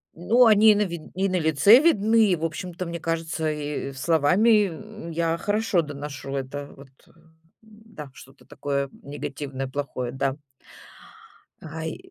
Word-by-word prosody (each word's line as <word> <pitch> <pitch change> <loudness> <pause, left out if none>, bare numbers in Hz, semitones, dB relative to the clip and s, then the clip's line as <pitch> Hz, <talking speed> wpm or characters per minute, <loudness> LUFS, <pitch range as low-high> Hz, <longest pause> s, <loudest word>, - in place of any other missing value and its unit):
Ну, 230 +9 +4
они 215 -1 +6
на 210 0 +1
ви 170 -2 -5 0.2
и 190 +1 +1
на 185 -1 0
лице 160 - +6
видны, 225 -7 +3
и, - - +3
в 165 0 -3
общем-то, 175 +3 -5
мне 170 0 -5
кажется, 165 -1 -2
и 150 -2 -4
словами, 175 - +3
м, 210 +1 -9
я 165 0 -1
хорошо 205 -3 +1
доношу 145 -2 -7
это 140 +1 -5
вот, 140 0 -15 0.2
э, - - -22 0.5
да, 215 -9 -13
что-то 135 0 -16
такое 140 -1 -3
негативное, 140 -1 -6
плохое, 130 -2 -4
да. 135 +1 -1 1.3
Ай. 160 +1 -6
165 Hz, 145 wpm, -24 LUFS, 145-205 Hz, 1.3 s, они